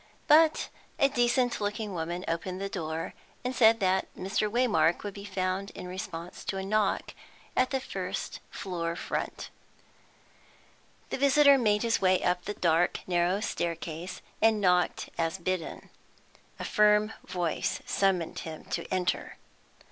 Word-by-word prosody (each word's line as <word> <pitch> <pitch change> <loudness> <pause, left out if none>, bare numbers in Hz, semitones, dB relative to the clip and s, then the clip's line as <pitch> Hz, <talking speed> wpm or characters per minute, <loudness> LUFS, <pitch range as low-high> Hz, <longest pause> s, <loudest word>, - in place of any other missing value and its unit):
But 315 +1 +5 0.3
a 275 -2 +4
decent 245 -2 +1
looking 205 0 -2
woman 175 +2 -3
opened 180 +3 -2
the 195 0 -3
door, 160 -4 -4 0.3
and 250 +1 -2
said 225 -1 +6
that 190 0 +2
Mr. 195 +3 0
Waymark 210 -9 +2
would 205 -1 -4
be 200 0 -9
found 190 0 -2
in 180 - -7
response 180 -2 -6
to 195 - -2
a 190 - -3
knock 210 0 0 0.4
at 255 - +3
the 265 - 0
first 260 - -4
floor 170 -3 -3
front. - - -4 1.6
The - - -2
visitor 280 +1 +6
made 210 -5 +2
his 230 -2 +1
way 185 -1 +3
up 180 0 +1
the 205 - -3
dark, 170 0 +2
narrow 180 +2 +1
stair 170 -5 -1
case, 165 +2 -7 0.2
and 220 -1 +4
knocked 180 -2 +2
as 165 0 0
bidden. 185 -3 -4 0.7
A - - -6
firm 210 0 +3
voice 175 -3 -1
summoned 190 -4 +1
him 160 -1 -7
to 170 - -3
enter. 185 -1 -1
190 Hz, 145 wpm, -29 LUFS, 175-215 Hz, 1.6 s, said